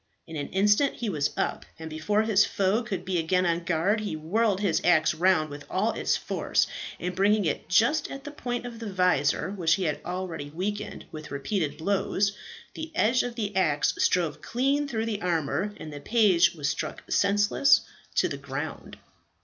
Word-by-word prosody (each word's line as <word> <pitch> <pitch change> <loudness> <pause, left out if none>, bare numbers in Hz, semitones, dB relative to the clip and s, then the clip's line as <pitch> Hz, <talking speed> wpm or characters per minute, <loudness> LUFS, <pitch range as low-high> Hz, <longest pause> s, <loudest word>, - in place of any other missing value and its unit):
In 160 - -9
an 145 -2 -3
instant 205 +8 +3
he 235 -3 -3
was 150 -3 0
up, - - -1
and 160 - -7
before 160 +8 0
his 215 -2 +4
foe 200 +4 +1
could 205 -5 -5
be 185 -2 0
again 180 +3 +1
on 170 0 0
guard, 175 +6 +1
he 210 -6 -3
whirled 195 +6 +1
his 200 -5 +1
axe 170 -3 +4
round 160 -2 +2
with 145 0 -8
all 210 +5 +1
its - - 0
force, - - 0 0.3
and 180 +1 -3
bringing 205 +1 +3
it 155 0 -2
just 235 +11 +3
at 275 0 -7
the 290 - -7
point 245 -4 -4
of 235 -2 -7
the 225 -3 -5
visor 180 -2 +1
which 170 -5 +2
he 195 - -3
had 150 -4 -1
already 180 -5 -4
weakened 195 +7 -4
with 155 -1 -8
repeated 145 +3 -2
blows, 200 +2 0 0.4
the 320 0 -6
edge 240 +1 +3
of 245 -1 -4
the 210 -4 -3
axe 150 -6 +2
stove 170 -4 +1
clean 275 +4 0
through 225 -5 -2
the 215 -3 -3
armour, 170 +2 0
and 155 - -8
the 145 - -7
page 195 -3 +4
was 145 -3 -2
struck 140 0 -3
senseless 205 +7 +4 0.3
to - - +3
the - - -5
ground. - - -6
190 Hz, 190 wpm, -27 LUFS, 160-215 Hz, 0.4 s, his